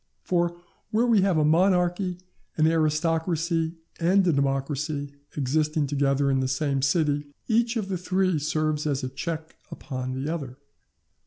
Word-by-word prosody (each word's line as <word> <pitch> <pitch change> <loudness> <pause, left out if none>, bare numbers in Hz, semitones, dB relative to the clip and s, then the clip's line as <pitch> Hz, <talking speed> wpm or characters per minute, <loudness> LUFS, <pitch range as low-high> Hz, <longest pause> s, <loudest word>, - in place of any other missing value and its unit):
For 175 -1 0 0.3
where 225 +2 +2
we 230 -5 +4
have 190 -3 +2
a 155 - +3
monarchy, 180 +2 +2 0.4
an 155 - +4
aristocracy, 165 +1 +1 0.2
and 185 +3 +3
a 170 - +3
democracy 140 +1 -1 0.2
existing 150 +2 +1
together 140 0 +1
in 135 - +2
the 130 - 0
same 135 +1 0
city, 145 0 +1 0.2
each 235 +1 +2
of 210 -3 -2
the 185 -2 -2
three 185 -2 +1
serves 155 0 -1
as 140 -2 -1
a 130 - -2
check 160 +4 -5 0.2
upon 130 -2 -5
the 135 +2 -3
other. 135 -6 -6
155 Hz, 150 wpm, -26 LUFS, 140-175 Hz, 0.4 s, we